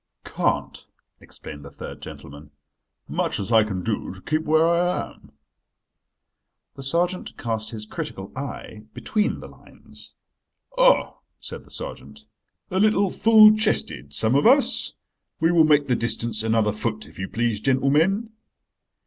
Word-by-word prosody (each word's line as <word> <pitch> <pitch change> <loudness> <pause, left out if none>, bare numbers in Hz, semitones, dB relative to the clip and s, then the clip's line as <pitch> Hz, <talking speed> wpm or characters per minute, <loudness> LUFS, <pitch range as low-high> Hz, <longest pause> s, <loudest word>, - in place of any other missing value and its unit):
"Can't," - - -2 0.3
explained 75 -1 -11
the 70 - -10
third - - -9
gentleman, 70 +2 -11 0.6
"much - - -2
as 100 +3 -4
I 110 -1 +6
can 95 -4 -4
do 110 -4 -3
to 95 - -14
keep 155 +1 -1
where 160 +2 +4
I 175 +1 0
am." - - -20 1.4
The 135 - -10
sergeant 175 +6 -1
cast 110 -2 -3
his 110 -2 -7
critical 95 -2 -7
eye 130 -5 -7
between 215 0 -1
the - - -9
lines. - - -15 0.6
"Ah," - - +3 0.2
said - - -8
the - - -20
sergeant, - - -8 0.5
"a 185 - 0
little 205 -2 +3
full 215 -1 +7
chested, 215 - -1
some 110 - +2
of 140 +9 +4
us. 270 +3 +3 0.5
We 165 +1 +3
will 165 -2 +5
make 150 -2 +3
the 125 - +2
distance 115 -1 -2
another 110 -1 +1
foot, 110 0 -3
if - - -15
you 95 - -3
please, 115 -2 -1
gentlemen." 150 - +1
135 Hz, 145 wpm, -23 LUFS, 110-180 Hz, 1.4 s, full